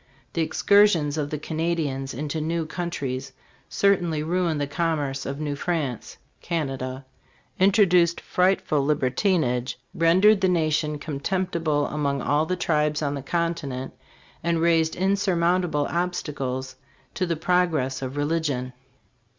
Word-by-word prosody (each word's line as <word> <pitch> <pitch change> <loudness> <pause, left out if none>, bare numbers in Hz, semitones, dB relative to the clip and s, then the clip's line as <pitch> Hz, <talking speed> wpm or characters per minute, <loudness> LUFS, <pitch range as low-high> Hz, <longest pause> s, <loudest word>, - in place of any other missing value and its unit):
The 165 - 0
excursions 165 -2 +3
of 150 -2 -2
the 150 - -3
Canadians 155 -4 -2
into 150 +4 -3
new 165 +1 -1
countries 135 -6 -4 0.4
certainly 175 -6 +1
ruined 170 -1 0
the 145 - 0
commerce 145 -3 -2
of 140 +1 -4
New 150 -2 -2
France 145 -7 -3 0.2
[Canada]; 135 -5 -3 0.5
introduced 180 -3 +4
frightful 180 -6 +1
libertinage; 135 - +1 0.2
rendered 190 +4 +4
the 190 - +3
nation 155 -3 +1
contemptible 155 0 -1
among 140 -2 -1
all 150 +4 +1
the 185 - 0
tribes 150 -3 0
on 140 -1 0
the 140 - -4
continent, 145 -4 -2 0.5
and 170 0 +1
raised 165 -1 +2
insurmounta 185 -2 +1
ble 145 -2 0
obstacles 140 -7 -3 0.4
to 185 - -1
the 170 - 0
progress 160 -6 +1
of 130 +1 -5
religion." 145 -4 -1
155 Hz, 125 wpm, -25 LUFS, 140-175 Hz, 0.5 s, introduced